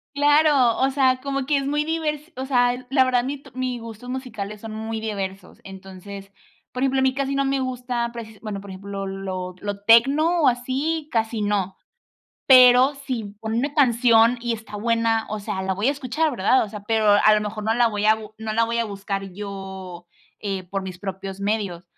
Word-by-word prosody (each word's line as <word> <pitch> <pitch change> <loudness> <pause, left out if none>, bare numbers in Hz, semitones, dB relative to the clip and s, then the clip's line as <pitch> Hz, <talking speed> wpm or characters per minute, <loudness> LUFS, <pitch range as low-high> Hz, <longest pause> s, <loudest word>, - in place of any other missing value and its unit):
Claro, 290 -4 +4
o 265 +1 +3
sea, 260 -2 +2
como 275 -1 -3
que 290 0 +2
es 275 - -3
muy 295 +1 0
divers 315 0 -3
o 260 - -4
sea, 245 -1 +1
la 265 -1 +4
verdad 250 -1 +1
mi 280 +2 -3
t - - -15
mis 255 -2 -3
gustos 230 +1 -10
musicales 220 -6 -6
son 220 0 -7
muy 220 0 -4
diversos. 195 -3 -5
Entonces, 195 +1 -10 0.4
por 250 - -4
ejemplo, 270 0 +1
a - - +1
mí 265 0 +2
casi 275 0 -2
no 275 0 +1
me 275 0 0
gusta, 245 -2 -2
por 235 -1 -6
ejemplo, 220 -2 -14
bueno 210 -3 -5
por 200 0 -11
ejemplo, 195 +1 -6
lo 190 -1 -5
lo 205 -1 -4
techno, 280 +10 +5
o, - - +6
así, 270 +6 -1
casi 225 -1 0
no, 200 -2 -1 0.7
pero 255 +1 +7
si 225 -6 -4
ponen 225 +1 -1
una 285 +2 -2
canción 240 -3 +4
y 240 0 -1
está 220 -1 -9
buena, 230 0 +1
o 215 - -3
sea, 195 -2 -4
la 190 0 -1
voy 205 +6 0
a 280 - +3
escuchar, 290 +3 -1
¿verdad? 245 +1 +2
O - - -8
sea, 210 0 -8
pero 215 +1 +2
a 210 +1 +5
lo 210 - +2
mejor 210 +1 -5
no 220 +1 +1
la 240 0 +3
voy 210 -1 -1
a 215 - +6
bu 215 -1 -11
no 220 -1 -4
la 230 +1 +2
voy 230 +1 -2
a 235 - +1
buscar 195 -2 -5
yo, 190 -3 -8 0.3
eh, 195 -2 -3
por 195 +2 -4
mis 185 -1 -7
propios 195 0 -6
medios. 200 -4 -2
225 Hz, 215 wpm, -23 LUFS, 200-260 Hz, 0.7 s, pero